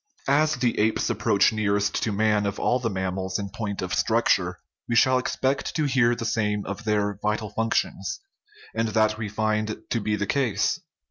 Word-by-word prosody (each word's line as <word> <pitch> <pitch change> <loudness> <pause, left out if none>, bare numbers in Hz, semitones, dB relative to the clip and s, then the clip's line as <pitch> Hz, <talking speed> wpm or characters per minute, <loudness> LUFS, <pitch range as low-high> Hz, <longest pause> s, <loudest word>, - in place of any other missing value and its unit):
As 155 +2 +3
the 125 -2 0
apes 110 +1 +1
approach 100 +2 +3
nearest 105 -1 0
to 115 - 0
man 105 0 +2
of 100 - -4
all 125 - +2
the 120 -2 -1
mam 95 -2 -2
mals 95 0 -2
in 100 -1 -4
point 100 -3 -4
of 90 0 -3
structure, - - +2 0.3
we 120 - +1
shall 130 +2 +5
expect 130 +2 -1
to 155 - +1
hear 125 -4 +3
the 115 - -5
same 105 -2 0
of 100 +2 -6
their 105 -2 0
vital 105 0 -1
functions; 115 - -1 0.5
and 115 0 0
that 110 0 +1
we 110 -1 -3
find 110 0 -1
to 115 - +1
be 105 +1 0
the 105 0 -1
case. 115 -4 0
110 Hz, 190 wpm, -25 LUFS, 105-115 Hz, 0.5 s, shall